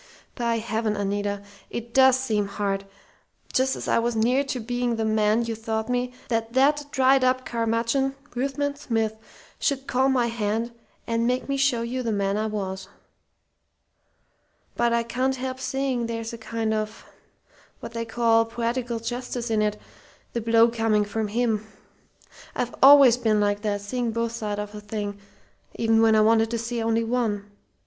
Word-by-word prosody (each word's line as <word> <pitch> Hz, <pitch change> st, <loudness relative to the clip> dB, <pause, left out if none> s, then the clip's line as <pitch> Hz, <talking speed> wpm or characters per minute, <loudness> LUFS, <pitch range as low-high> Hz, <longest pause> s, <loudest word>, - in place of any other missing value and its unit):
"By 235 Hz, -2 st, 0 dB
heaven, 220 Hz, -1 st, -1 dB
Anita, 205 Hz, 0 st, -2 dB, 0.3 s
it 235 Hz, 0 st, -6 dB
does 265 Hz, -1 st, +6 dB
seem 215 Hz, -6 st, 0 dB
hard, 200 Hz, -1 st, -2 dB, 0.7 s
just 265 Hz, +1 st, +2 dB
as -, -, -6 dB
I -, -, +3 dB
was 235 Hz, 0 st, -1 dB
near 245 Hz, +5 st, +2 dB
to 265 Hz, -2 st, -3 dB
being 245 Hz, +1 st, -1 dB
the 225 Hz, 0 st, -1 dB
man 215 Hz, +1 st, +2 dB
you 230 Hz, -, -2 dB
thought 220 Hz, 0 st, -3 dB
me, 250 Hz, 0 st, 0 dB, 0.2 s
that 230 Hz, -1 st, -1 dB
that 290 Hz, +3 st, +3 dB
dried 265 Hz, -1 st, +4 dB
up 255 Hz, 0 st, +2 dB
curmudgeon 230 Hz, +4 st, 0 dB, 0.2 s
Ruthven 275 Hz, +3 st, -1 dB
Smith 225 Hz, -6 st, -1 dB, 0.4 s
should 275 Hz, -2 st, 0 dB
call 265 Hz, +1 st, +2 dB
my 255 Hz, -3 st, +2 dB
hand 230 Hz, 0 st, -1 dB, 0.3 s
and 230 Hz, 0 st, 0 dB
make 250 Hz, +1 st, 0 dB
me 275 Hz, -, 0 dB
show 270 Hz, -4 st, +2 dB
you 250 Hz, +2 st, -3 dB
the 230 Hz, -2 st, -1 dB
man 200 Hz, -1 st, 0 dB
I 215 Hz, +1 st, 0 dB
was! 195 Hz, -3 st, -4 dB, 1.9 s
But 235 Hz, 0 st, +2 dB
I 235 Hz, 0 st, +2 dB
can't 255 Hz, +3 st, -1 dB
help 260 Hz, 0 st, -4 dB
seeing 265 Hz, -3 st, -1 dB
there's 230 Hz, 0 st, -4 dB
a -, -, -6 dB
kind 225 Hz, 0 st, -2 dB
of 215 Hz, 0 st, -4 dB, 0.7 s
what 230 Hz, -, -8 dB
they 230 Hz, 0 st, -3 dB
call 225 Hz, 0 st, +2 dB
poetical 235 Hz, +1 st, -2 dB
justice 240 Hz, 0 st, -4 dB
in 215 Hz, -1 st, +2 dB
it, 210 Hz, 0 st, 0 dB, 0.5 s
the 235 Hz, -, -1 dB
blow 230 Hz, +1 st, +5 dB
coming 225 Hz, -2 st, +1 dB
from 215 Hz, +1 st, -2 dB
him. 220 Hz, -1 st, 0 dB, 0.9 s
I've 245 Hz, -, -2 dB
always 270 Hz, -3 st, +8 dB
been 220 Hz, -3 st, +2 dB
like 205 Hz, 0 st, +1 dB
that: 205 Hz, -1 st, -1 dB
seeing 240 Hz, +3 st, -2 dB
both 230 Hz, 0 st, -1 dB
sides 210 Hz, -3 st, -3 dB
of 210 Hz, 0 st, -7 dB
a 210 Hz, -, -8 dB
thing 205 Hz, -1 st, -5 dB, 0.6 s
even 225 Hz, 0 st, +3 dB
when 225 Hz, -1 st, +5 dB
I 215 Hz, -, +5 dB
wanted 225 Hz, +1 st, +4 dB
to 235 Hz, -, -1 dB
see 230 Hz, +1 st, -3 dB
only 225 Hz, 0 st, +1 dB
one. 220 Hz, -4 st, -1 dB
230 Hz, 170 wpm, -25 LUFS, 220-250 Hz, 1.9 s, always